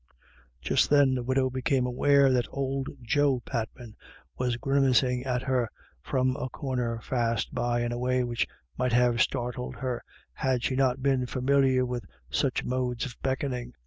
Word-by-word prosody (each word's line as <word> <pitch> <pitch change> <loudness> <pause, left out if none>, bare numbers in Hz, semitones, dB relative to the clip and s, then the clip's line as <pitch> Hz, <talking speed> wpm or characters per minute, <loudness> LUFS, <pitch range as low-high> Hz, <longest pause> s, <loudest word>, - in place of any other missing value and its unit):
Just - - +2
then 145 -2 +5
the 125 - -1
widow 130 +1 +1
became 130 0 +1
aware 135 +2 +4
that 125 -2 +1
old 135 0 -2
Joe 140 +2 +2
Patman 115 -2 -5 0.4
was 125 -1 -1
grimacing 130 -2 +2
at 125 -1 -1
her 125 -4 0 0.3
from 130 - 0
a 130 - -3
corner 125 -3 -2
fast 115 -3 -1
by 120 0 0
in 120 0 -1
a 120 - -3
way 125 0 +1
which 120 -1 -1 0.3
might 125 -1 +1
have 120 -1 +3
startled 125 +1 -1
her 125 -3 -3 0.3
had 130 -4 0
she 130 - 0
not 130 -1 +1
been 135 -2 +2
familiar 130 0 +2
with 125 -2 -3 0.3
such 125 - 0
modes 125 -2 -1
of 125 -2 -7
beckon 135 0 -1
ing. 125 -1 -6
125 Hz, 165 wpm, -28 LUFS, 120-135 Hz, 0.4 s, then